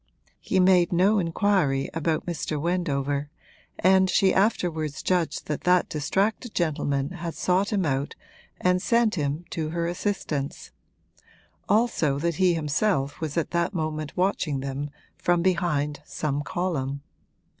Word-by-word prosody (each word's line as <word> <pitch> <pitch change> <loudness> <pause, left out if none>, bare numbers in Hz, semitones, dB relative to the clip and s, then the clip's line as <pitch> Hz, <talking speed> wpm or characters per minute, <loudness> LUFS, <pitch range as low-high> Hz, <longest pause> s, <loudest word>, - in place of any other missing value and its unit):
He 190 - 0
made 180 -2 +5
no 195 +5 +4
inquiry 165 -6 +1
about 160 0 -1
Mr. 155 -3 -3
Wendover, 145 -4 -1 0.5
and 190 +1 +4
she 190 +1 +3
afterwards 170 -7 0
judged 180 -3 0
that 150 - -3
that 180 0 +3
distracted 195 - -1
gentleman 145 -3 0
had 170 -2 -5
sought 185 +4 +1
him 195 -4 +1
out 140 -1 -1 0.4
and 180 0 +2
sent 230 +1 +2
him 150 -1 -2
to 155 -2 -2
her 170 +1 -2
assistance; 170 -6 -3 1.0
also 205 -10 +2
that 170 +1 -1
he 185 -2 +3
himself 150 -1 0
was 155 0 -3
at 165 - -1
that 170 +3 0
moment 155 -1 -3
watching 180 -7 0
them 140 +2 -4 0.3
from 175 -1 +2
behind 150 -6 0
some 145 -1 -2
column. 140 -5 -2
170 Hz, 135 wpm, -26 LUFS, 145-185 Hz, 1.0 s, made